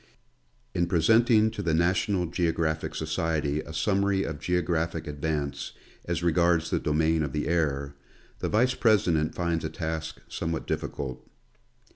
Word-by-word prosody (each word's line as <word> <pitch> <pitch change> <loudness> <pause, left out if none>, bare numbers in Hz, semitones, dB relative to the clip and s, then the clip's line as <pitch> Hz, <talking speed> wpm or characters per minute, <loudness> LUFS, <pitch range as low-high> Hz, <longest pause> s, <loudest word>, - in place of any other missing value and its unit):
In 85 - +1
presenting 110 +5 +4
to 105 - -5
the 85 -5 +1
National 90 +2 +1
Geographic 80 -2 -1
Society 80 -2 -1
a 75 - -10
summary 95 +4 +1
of 80 -3 -4
geographic 85 -2 -1
advance 75 -1 -3 0.3
as 85 -1 -2
regards 85 -1 +2
the - - +2
domain 80 +1 +1
of 75 -3 -2
the 75 - -1
air, 70 -4 0 0.5
the - - -2
Vice 125 +4 +3
president 90 -11 +2
finds 85 -2 -1
a 80 - -2
task 80 -1 -4
somewhat 80 -1 -3
difficult. 65 -2 -4
80 Hz, 135 wpm, -27 LUFS, 80-90 Hz, 0.5 s, presenting